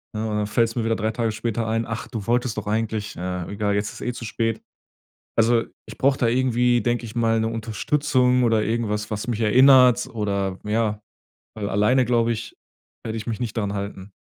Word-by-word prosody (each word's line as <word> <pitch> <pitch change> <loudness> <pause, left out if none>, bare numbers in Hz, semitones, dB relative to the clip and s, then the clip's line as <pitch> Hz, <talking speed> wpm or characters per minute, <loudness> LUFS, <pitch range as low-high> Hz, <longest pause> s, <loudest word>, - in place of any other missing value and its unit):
ne? 110 +1 -2
Und 105 -1 -1
dann 105 -1 -1
fällt's 115 +1 +1
mir 120 - -1
wieder 115 0 +1
drei 110 0 -1
Tage 115 0 -1
später 115 +1 -2
ein: 115 +1 0
„Ach, 115 0 -5
du 110 -5 -6
wolltest 120 -1 0
doch 110 - -4
eigentlich 110 -1 -2
naja, 90 0 -4
egal, 100 0 -1
jetzt 105 +1 -3
ist 125 -1 -3
zu 115 - -6
spät.“ 115 +1 -2 0.8
Also, 115 +1 +3 0.2
ich - - -9
brauch 135 0 +2
da 120 - +2
irgendwie, 120 -1 +2
denk 120 +2 0
ich 115 -2 -8
mal, 115 -1 +2
'ne 110 - 0
Unterstützung 125 +3 +1
oder 115 -2 +3
irgendwas, 105 -2 -2
was 110 +2 -4
mich 115 -2 -2
erinnert 125 +2 +6
oder 100 -4 -2
ja 105 0 0 0.6
weil 105 -2 -3
alleine 105 +7 +3
glaub 120 -1 +2
ich, 115 -1 -4 0.5
werde 110 0 -3
ich 110 - -7
mich 115 -1 -3
nicht 120 -2 -4
daran 100 -2 -1
halten. 100 -1 -6
115 Hz, 200 wpm, -23 LUFS, 105-120 Hz, 0.8 s, erinnert